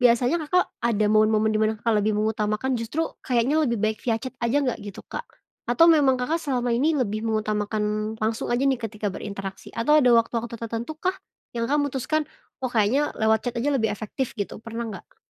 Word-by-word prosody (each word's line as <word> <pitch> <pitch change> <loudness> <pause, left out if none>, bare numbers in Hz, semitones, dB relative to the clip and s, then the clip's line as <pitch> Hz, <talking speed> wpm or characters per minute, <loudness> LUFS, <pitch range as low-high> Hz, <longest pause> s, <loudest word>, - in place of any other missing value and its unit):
biasanya 245 +4 +4
Kakak 360 +1 +4 0.2
ada 215 -2 +2
momen-momen 215 0 +4
di 215 - +1
mana 215 0 +3
Kakak 230 -1 +1
lebih 210 +1 +1
mengutamakan 215 +3 0
justru, 230 +8 -3 0.3
kayaknya 250 +4 +2
lebih 235 -2 0
baik 215 0 +1
via 230 - +2
chat 260 -1 -5
aja 235 +4 +1
nggak, 250 -3 -1
gitu, 200 - -8
Kak, - - -5 0.4
atau 245 +7 +5
memang 285 -5 +5
Kakak 315 +7 0
selama 250 -5 -1
ini 285 +7 +2
lebih 215 -6 -1
mengutamakan, 215 0 -1
langsung 220 +1 -1
aja 250 - 0
nih 270 -3 +2
ketika 215 -2 -3
berinteraksi, 195 -1 -7
atau 300 +7 +4
ada 255 - +4
waktu-waktu 230 0 +1
tertentukah, 235 +11 -3 0.4
yang 230 -1 -1
Kakak 290 +3 +2
mutuskan, 285 +3 -1 0.4
"Oh, 255 - -1
kayaknya 240 +7 +2
lewat 220 0 +3
chat 245 -1 -2
aja 285 - 0
lebih 220 -4 +1
efektif." 220 +5 -4
Gitu, 200 - -3
pernah 230 +1 -4
nggak? 200 - -11
230 Hz, 190 wpm, -25 LUFS, 215-265 Hz, 0.4 s, atau